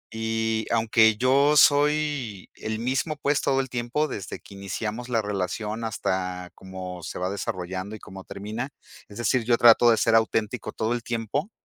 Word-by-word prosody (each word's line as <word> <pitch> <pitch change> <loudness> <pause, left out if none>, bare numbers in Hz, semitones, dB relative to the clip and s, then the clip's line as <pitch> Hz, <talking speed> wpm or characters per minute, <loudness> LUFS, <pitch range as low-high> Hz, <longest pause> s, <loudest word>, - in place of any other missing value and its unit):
Y 110 0 -1
aunque 110 -1 +4
yo 140 +4 +4
soy 145 -8 +2
el 110 0 -4
mismo, 130 +7 -1
pues, 145 -1 0
todo 135 -1 +1
el 130 - -6
tiempo 125 +5 -1
desde 100 -8 -6
que 100 - -15
iniciamos 105 +5 -5
la 115 -3 +1
relación 105 +3 -3
hasta 90 -4 -3
cómo 95 -1 -8
se 80 - -6
va 90 +1 -2
desarrollando, 95 +1 -4
y 110 - -10
cómo 95 0 -11
termina. 105 +8 -5 0.4
Es 105 - -12
decir, 120 +1 +1
yo 120 +1 +3
trato 120 0 +7
de 115 - +4
ser 115 - +2
auténtico 110 -1 +1
todo 110 +2 -1
el 120 - -2
tiempo. 120 - -2
110 Hz, 170 wpm, -25 LUFS, 100-125 Hz, 0.4 s, trato